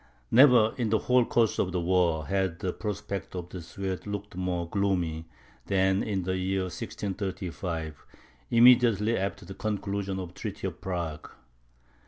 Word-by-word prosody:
Never, 125 -4 +7
in 120 -4 0
the 110 - +3
whole 125 +3 +3
course 115 -2 +1
of 90 - +1
the 90 - -1
war, 85 -3 +2
had 95 -3 0
the 90 +1 -3
prospects 100 -2 -5
of 90 -1 -5
the 90 - -7
Swedes 95 +3 -5
looked 105 -1 -5
more 90 -2 -2
gloomy, 85 -4 -1 0.4
than 95 0 +2
in 100 -4 -1
the 95 +1 -1
year 95 +1 0
1635, 90 -3 -4 0.5
immediately 115 -2 +5
after 100 -1 -3
the 95 - -8
conclusion 100 -2 -3
of 90 -2 -5
the 90 - -16
treaty 105 -3 -5
of 90 -2 -5
Prague. 85 -5 -4
95 Hz, 155 wpm, -28 LUFS, 90-105 Hz, 0.5 s, Never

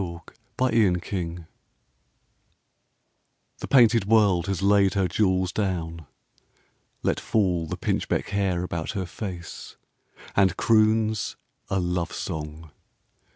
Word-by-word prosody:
SPRING 85 -2 -4 0.7
AND 90 -3 +2
AUTUMN 85 -4 -5 2.1
The - - -6
painted 115 -5 +5
World 100 -5 +3
has 95 -1 -2
laid 100 -1 +4
her 95 -2 +2
jewels 95 0 +1
down, 85 -6 -3 1.0
Let - - +1
fall 90 -6 0
the - - -4
pinchbeck - - -1
hair 95 -3 0
about 85 0 -4
her 95 -3 -2
face 90 -1 -8 0.6
And 95 -3 +3
croons 110 -1 +2 0.3
a 95 - 0
love 90 -1 -2
song. 80 -2 -6
95 Hz, 110 wpm, -25 LUFS, 85-100 Hz, 2.1 s, painted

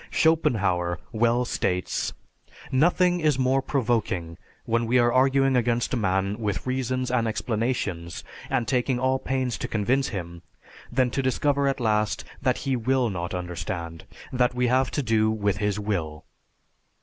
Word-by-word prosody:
Schopenhauer 95 - +2
well 120 +2 +2
states, 90 -5 -1 0.6
"Nothing 175 +5 +3
is 155 -4 +2
more 130 +1 +2
provoking, 110 - -1 0.3
when 115 0 0
we 125 +2 +3
are 120 -1 +3
arguing 135 +1 +3
against 120 0 +1
a - - +3
man 100 -1 0
with 105 -3 -2
reasons 130 0 -1
and 120 -2 +1
explanations, 110 -7 -2 0.3
and 115 - 0
taking 125 0 +1
all 130 +1 +1
pains 130 -2 -2
to - - -3
convince 125 +6 +1
him, 85 -4 -6 0.5
than 125 0 +2
to 135 - 0
discover 140 +2 +1
at 135 0 0
last 110 -2 0 0.2
that 130 -3 +1
he 135 -1 +1
will 125 0 +1
not 85 0 -4
understand, 85 -2 -5 0.3
that 125 -1 +2
we 125 0 +1
have 130 +1 +2
to 145 - -2
do 110 -2 +2
with 105 -2 0
his 105 0 -1
will." 85 -8 -3
120 Hz, 150 wpm, -25 LUFS, 100-130 Hz, 0.6 s, Nothing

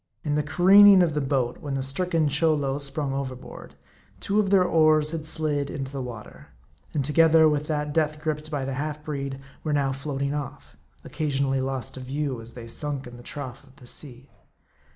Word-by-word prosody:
In 150 - -1
the 150 - +2
careening 190 +4 +7
of 165 -3 0
the 150 - 0
boat, 130 -3 -1
when 140 -2 -4
the 135 - -1
stricken 165 +3 0
Cholo 145 -2 +1
sprung 140 0 -2
overboard, 130 -2 -7 0.4
two 200 +2 0
of 205 -2 +1
their 195 -2 +5
oars 155 -3 +3
had 160 -2 -5
slid 150 -3 -1
into 135 -3 -5
the 140 -1 -4
water; 115 -4 -9 0.4
and 140 -3 -1
together 160 +1 +5
with 150 -1 0
that 150 -1 -2
death 155 -1 0
griped 155 0 -3
by 145 -3 -2
the 135 - -3
half 150 +2 -4
breed, 140 -2 -4 0.2
were 155 - -1
now 140 -2 +1
floating 140 +1 -3
off; 145 -3 -6 0.3
occa 155 -1 -3
sionally 135 -1 0
lost 135 0 -3
to 130 - -9
view, 135 -1 -3
as 115 +1 -8
they 120 -2 -9
sunk 140 +3 -4
in 120 0 -10
the - - -12
trough 135 0 -7
of 135 -1 -21
the 125 - -16
sea. 125 -1 -6
145 Hz, 195 wpm, -25 LUFS, 135-155 Hz, 0.4 s, careening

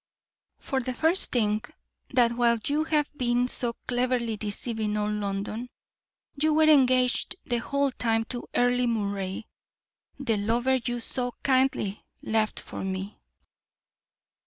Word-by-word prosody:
"For 265 - -2
the 255 0 -4
first 325 +7 +3
thing, 215 -3 +1 0.5
that 245 -2 +3
while 235 -1 +2
you 300 +2 +1
have 300 -2 +1
been 245 -1 +1
so 240 -1 -1
cleverly 245 -2 0
deceiving 210 0 -2
all 210 0 0
London, 210 +3 -3 0.6
you 305 +1 +1
were 315 - +5
engaged 255 -4 +4
the 240 - 0
whole 280 +3 0
time 225 -2 0
to 240 +1 -6
Earle 245 0 +3
Moray, 200 -3 -2 0.7
the 250 -6 0
lover 240 +5 +1
you 240 0 -2
so 245 0 +1
kindly 260 -6 +1 0.2
left 220 -1 0
for - - -6
me." 190 +1 -4
240 Hz, 130 wpm, -27 LUFS, 215-255 Hz, 0.7 s, were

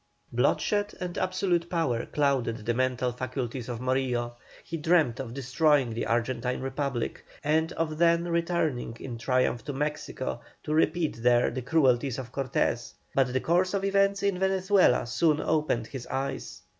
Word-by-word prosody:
Bloodshed 205 0 +1
and 180 -1 -4
absolute 185 -2 0
power 160 -10 0
clouded 130 -7 0
the 120 - +1
mental 125 0 0
faculties 125 0 -4
of 120 -2 -4
Morillo; 125 -2 0 0.3
he 165 - -6
dreamed 160 -6 +2
of 125 -2 -5
destroying 135 -1 +2
the 115 - -2
Argentine 120 +1 0
Republic, 135 -2 -3 0.2
and 160 +2 +2
of 155 -1 -2
then 170 0 +4
returning 170 -8 -1
in 120 -3 -6
triumph 125 0 +1
to 145 - -4
Mexico 140 -4 -3 0.2
to 150 - -2
repeat 155 -5 +1
there 120 0 +4
the 130 +2 -4
cruelties 135 -3 +2
of 125 -2 -6
Cortes, 125 -3 -1 0.2
but 130 -2 +2
the 130 0 0
course 180 +3 +2
of 195 0 0
events 195 0 +2
in 200 -2 +1
Venezuela 190 -7 +3
soon 150 +6 +2
opened 150 -7 0
his 130 +1 -8
eyes. 135 0 -4
135 Hz, 155 wpm, -28 LUFS, 125-170 Hz, 0.3 s, then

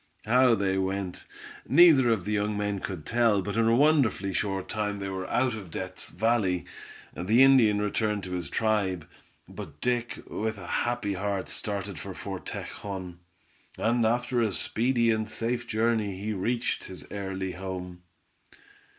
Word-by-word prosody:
How 125 +1 +5
they 95 -2 0
went, 95 -1 -3 0.4
neither 145 -5 +7
of 110 -6 +1
the 105 - -2
young 105 0 0
men 105 -1 -1
could 90 -5 -6
tell, 115 -4 +3
but 100 +1 -4
in 115 0 +3
a 115 - +4
wonderfully 130 -9 +3
short 95 -1 -1
time 105 -1 -2
they 100 -1 -4
were 95 -1 -4
out 130 -2 +1
of 105 -5 -7
Death's 95 +2 -5
Valley. 100 -3 +1 0.5
The 110 +10 +4
Indian 120 -6 +6
returned 105 0 0
to 90 - -6
his 90 -4 -3
tribe, 100 -6 0 0.4
but 75 -1 -9
Dick, 120 +2 -1
with 110 0 -3
a 90 - -9
happy 120 0 -1
heart, 100 0 -2
started 100 -4 -3
for - - -7
Fort - - -6
Tejon, 95 -3 -6 0.6
and 120 +1 +2
after 120 +2 +1
a 110 -3 +1
speedy 115 +3 +1
and 110 -1 -1
safe 120 +2 -2
journey 110 -4 0
he 105 +2 -2
reached 115 +5 -1
his 95 - -9
early 95 -2 -3
home. 90 -1 -6
105 Hz, 160 wpm, -28 LUFS, 95-115 Hz, 0.6 s, neither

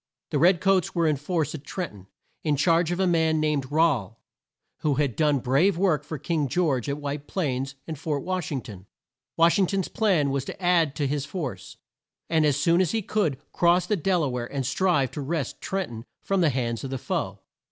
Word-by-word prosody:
The - - +1
red 175 +1 +4
coats 195 -3 +2
were 170 -1 +2
in 155 -2 +3
force 155 +1 -2
at 155 - -6
Tren 180 +2 -4
ton, 95 -2 -15 0.4
in 150 -2 +2
charge 165 +3 +3
of 175 +1 -2
a 190 - +3
man, 160 -3 +2
named 150 -3 0
Rahl, 135 - +1 0.6
who 150 -2 +1
had 140 -4 0
done 150 -2 +3
brave 140 +9 +2
work 170 -6 +2
for 155 +1 -6
King 155 0 -1
George 140 -5 0
at 140 - -1
White 145 0 -5
Plains 135 -6 -2
and 160 -4 -6
Fort 150 -3 -2
Wash 185 -3 -2
ing 135 -3 -2
ton. 100 -6 -11 0.5
Wash 170 +4 +4
ing 190 - +4
ton's 195 -2 -1
plan 175 -11 +2
was 135 -1 -1
to - - -7
add 170 -5 +2
to 145 - -1
his 140 0 -2
force, 140 - -6 0.5
and, 160 -2 +4
as 145 - +2
soon 170 +1 +3
as 185 - 0
he 225 -2 0
could, 180 -10 0
cross 175 +1 +3
the 210 - +1
Del 180 -1 +1
a 140 - 0
ware 125 -1 -4
and 135 -2 -2
strive 145 -3 +1
to 150 - -5
wrest 145 -1 -3
Tren 190 -1 -2
ton 115 0 -9 0.2
from 195 -1 +1
the 165 - +4
hands 120 -3 -2
of 135 - -4
the 135 - -3
foe. - - -3
155 Hz, 220 wpm, -26 LUFS, 135-175 Hz, 0.6 s, red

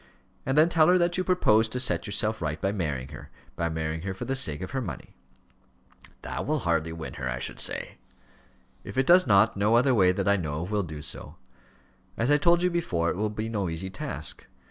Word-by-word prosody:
And 135 +2 0
then 155 +2 +7
tell 165 -2 +4
her 180 - +5
that 175 0 +1
you - - +1
propose 115 - +3
to 125 - -3
set 90 -9 +2
yourself 110 +1 0
right 75 -1 -2
by 95 - 0
marrying 75 -10 -3
her - - -11 0.3
by 85 0 -1
marrying 80 0 -3
her 95 +1 -4
for - - -6
the 135 - -2
sake 80 - 0
of 95 - -7
her 135 - -2
money." 100 - -7 1.1
"That - - -5
will 150 -2 0
hardly 85 -2 0
win 80 -1 -7
her, 65 - -2
I - - -3
should - - -3
say." - - -3 0.8
"If - - -9
it 130 - +3
does 180 +3 +6
not, 105 +2 +4
no 105 +3 +2
other 125 +2 +4
way, 95 -5 +4
that 95 +1 -2
I 100 0 +4
know 80 -3 -3
of, 90 - -7
will 105 -1 +1
do 75 -5 -7
so. - - -7 0.8
As 120 +5 +1
I 145 - +6
told 170 +4 +3
you 180 - +2
before, 90 - 0
it - - -4
will 105 +3 -1
be 110 +1 -4
no 100 -5 -2
easy 85 +4 -4
task. - - -5
100 Hz, 230 wpm, -27 LUFS, 85-135 Hz, 1.1 s, then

